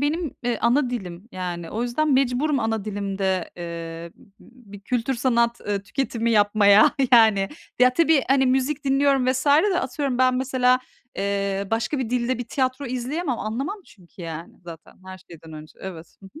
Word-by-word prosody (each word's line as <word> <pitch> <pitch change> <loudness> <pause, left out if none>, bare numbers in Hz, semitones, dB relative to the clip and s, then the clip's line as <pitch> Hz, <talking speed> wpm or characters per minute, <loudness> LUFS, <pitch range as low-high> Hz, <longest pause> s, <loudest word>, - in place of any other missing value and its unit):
benim, 300 +1 -1
e, 240 -2 -1
ana 245 +2 +2
dilim 190 -3 -6
yani. 175 -2 -5
O 225 +3 -3
yüzden 275 +5 0
mecburum 270 +2 +1
ana 225 -2 -1
dilimde, 195 -3 -2
ııı, 170 -1 -7
b - - -23 0.2
b 245 -5 -19
bir 205 - -10
kültür 245 +4 -1
sanat, 235 -1 +1
ııı, 200 -1 -3
tüketimi 235 +1 -2
yapmaya 205 -1 +5 0.2
yani. 220 -4 +5 0.3
Ya, 250 0 +5
tabii, 320 -4 +3
hani, 265 -1 +3
müzik 265 +3 0
dinliyorum 275 -1 +2
vs. 255 +2 0
de, 355 +7 +4
atıyorum, 265 -1 -3
ben 255 0 +3
mesela, 255 -1 +2 0.4
eee, 200 0 -2
başka 230 +5 -1
bir 245 -3 -3
dilde 250 0 0
bir 245 - -4
tiyatro 260 +1 -1
izleyemem. 255 +3 -3
Anlamam 270 - -4
çünkü, 180 -2 -15
yani, 165 0 -7
zaten 165 -2 -12
her 185 0 -9
şeyden 165 -3 -14
önce. 155 0 -12
Evet. 175 -3 -9
Hı 195 - -11
hı. - - -13
235 Hz, 170 wpm, -23 LUFS, 195-265 Hz, 0.4 s, yapmaya